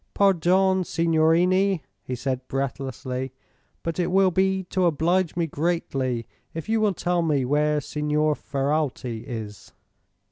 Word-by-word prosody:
"Pardon, 190 0 +3
signorini," 170 +3 +2 0.2
he 125 - -4
said, 130 0 -3
breathlessly, 130 -1 -3 0.5
"but 165 +1 -3
it 175 - +1
will 190 0 +4
be 190 +1 +1
to 185 0 0
oblige 170 +3 +1
me 170 -1 +1
greatly 140 -7 -1 0.3
if 165 - -5
you 220 0 +1
will 205 -3 +2
tell 175 +1 0
me 145 -5 +1
where 150 +2 +2
Signor 150 +1 0
Ferralti 135 -5 -2
is." 110 -4 -7
160 Hz, 130 wpm, -25 LUFS, 135-180 Hz, 0.5 s, will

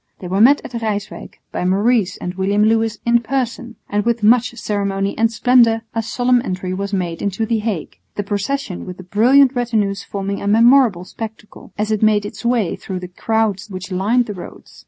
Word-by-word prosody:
They 180 - -8
were 190 +3 0
met 275 +5 +6
at - - -9
Ryswyck 210 -2 -5
by - - -3
Maurice 200 +1 +1
and 180 - -5
William 195 +2 +1
Lewis 225 0 +1
in 235 0 +4
person, 240 -1 -3
and 205 0 -1
with 235 0 0
much 235 +2 +4
ceremony 200 -3 -2
and 225 0 +2
splendour 230 -1 +3
a 225 - 0
solemn 245 +2 +1
entry 185 -4 -4
was 200 +1 -4
made 175 -4 -2
into 200 +2 -1
the 225 0 0
Hague, 210 -7 -4 0.2
the 205 - -2
procession 205 +1 -3
with 180 0 -7
the 185 - -10
brilliant 250 +8 +4
retinues 215 -5 -1
forming 200 0 -4
a 200 - -4
memorable 230 -3 +4
spectacle, 220 +1 -9
as 210 +1 -1
it 215 - 0
made 215 -1 +3
its 210 +1 -8
way 235 -7 +1
through 185 -1 -6
the 180 0 -8
crowds 220 +1 -1
which 190 0 -7
lined 215 +7 +1
the 210 - -5
roads. 180 - -11
215 Hz, 195 wpm, -19 LUFS, 195-235 Hz, 0.2 s, met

